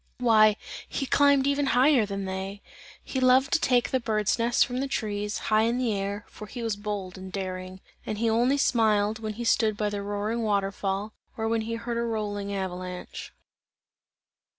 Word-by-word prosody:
Why 215 -3 +5 0.3
he 275 - -2
climbed 280 0 +4
even 280 0 +1
higher 255 -4 +5
than 200 -1 -4
they! 190 +1 -5 0.4
He 265 - -3
loved 255 +1 +4
to 340 - +4
take 245 -5 +2
the 260 - +2
bird's 215 -1 0
nests 235 +3 +3
from 250 -1 -3
the 275 - -1
trees, 210 -4 -2 0.2
high 215 - +5
in 230 +2 +1
the 245 -4 0
air, 200 +1 -3
for 210 - -10
he 240 +2 -6
was 225 -3 -1
bold 200 -3 -5
and 190 0 -8
daring; 185 -1 -5 0.2
and 215 - -4
he 230 +2 0
only 240 +5 +3
smiled 220 -4 +2
when 215 -1 -4
he 235 +3 -5
stood 220 -2 +2
by 210 -1 -1
the 205 -1 -3
roaring 205 +3 -2
water 200 -3 +1
fall, 200 +2 -3 0.2
or 220 0 -1
when 225 0 +1
he 230 +1 -3
heard 235 +1 -4
a - - 0
rolling 210 -3 -3
avalanche. 185 -2 -5
215 Hz, 190 wpm, -27 LUFS, 200-235 Hz, 0.4 s, Why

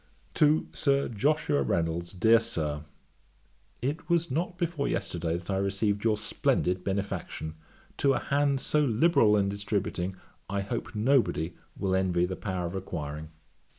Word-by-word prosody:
'To 155 +1 +3
SIR 140 -1 +1
JOSHUA 120 - +1
REYNOLDS. 85 +5 -1
'DEAR 110 +5 +5
SIR, 80 -10 -3 1.0
'It 150 +7 -2
was 170 -3 +2
not 175 +5 -1
before 170 -5 -1
yesterday 85 -4 -1
that 85 +3 -6
I 95 - +1
received 100 +1 0
your 110 -2 +3
splendid 90 -3 0
benefaction. 95 -5 -3 0.4
To 140 -1 +3
a - - 0
hand 140 -1 +1
so 150 - +1
liberal 115 -4 +4
in 100 -1 +2
distributing, 100 -2 -2 0.3
I 100 0 -1
hope 100 +2 -4
nobody 110 - +2 0.2
will 95 -1 0
envy 90 -2 +2
the 95 +1 -3
power 95 -3 -3
of 85 - -4
acquiring. 75 -5 -5
100 Hz, 145 wpm, -29 LUFS, 90-135 Hz, 1.0 s, DEAR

